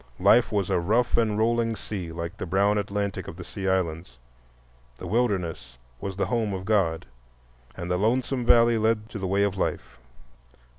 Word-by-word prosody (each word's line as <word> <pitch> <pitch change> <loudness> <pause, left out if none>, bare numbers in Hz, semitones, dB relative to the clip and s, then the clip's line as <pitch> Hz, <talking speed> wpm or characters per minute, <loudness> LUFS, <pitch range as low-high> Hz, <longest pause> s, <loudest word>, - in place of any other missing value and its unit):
Life 110 +6 +5
was 100 -4 0
a - - +2
"rough 110 +8 +1
and 110 -3 +2
rolling 115 +1 +1
sea" 95 -6 -6
like 85 +2 -5
the - - -5
brown 100 +4 +2
Atlantic 100 -2 -3
of - - -7
the 90 - -7
Sea 95 +2 -6
Islands; 80 -7 -2 0.8
the 90 - -9
"Wilderness" 95 - -1 0.2
was 95 +5 -5
the 100 - +1
home 110 -1 -1
of 95 0 -6
God, 95 -6 +1 0.7
and 85 +1 -4
the 90 - +2
"lonesome 125 +4 0
valley" 115 -1 +5
led 110 0 0
to 110 - -6
the 95 - -2
way 100 +2 +2
of 100 -1 -1
life. - - -3
100 Hz, 180 wpm, -26 LUFS, 90-110 Hz, 0.8 s, Life